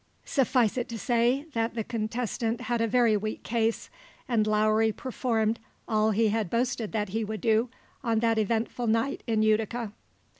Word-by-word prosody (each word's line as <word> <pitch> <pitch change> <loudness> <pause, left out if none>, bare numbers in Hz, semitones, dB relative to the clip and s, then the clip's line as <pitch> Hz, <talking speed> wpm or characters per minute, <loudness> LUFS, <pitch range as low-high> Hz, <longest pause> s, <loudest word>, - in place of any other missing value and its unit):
Suffice 250 -4 +2
it 240 - -4
to 230 - -5
say 240 +5 +1
that 230 0 -1
the 225 - -1
contestant 230 +1 -2
had 240 -2 -1
a 230 - +2
very 230 -1 +3
weak 215 +1 -3
case, 230 -1 -1 0.4
and 220 -4 +2
Lowry 215 +1 +3
performed 230 -1 -1 0.3
all 215 0 +2
he 220 +1 +2
had 215 -3 -1
boasted 235 -1 -1
that 210 -3 -1
he 220 +3 -1
would 215 0 -4
do 225 +1 +2 0.3
on 230 -3 +1
that 225 0 +2
eventful 230 +3 -1
night 225 +5 +1
in 220 -2 +2
Utica. 220 +1 +1
225 Hz, 165 wpm, -28 LUFS, 215-235 Hz, 0.4 s, very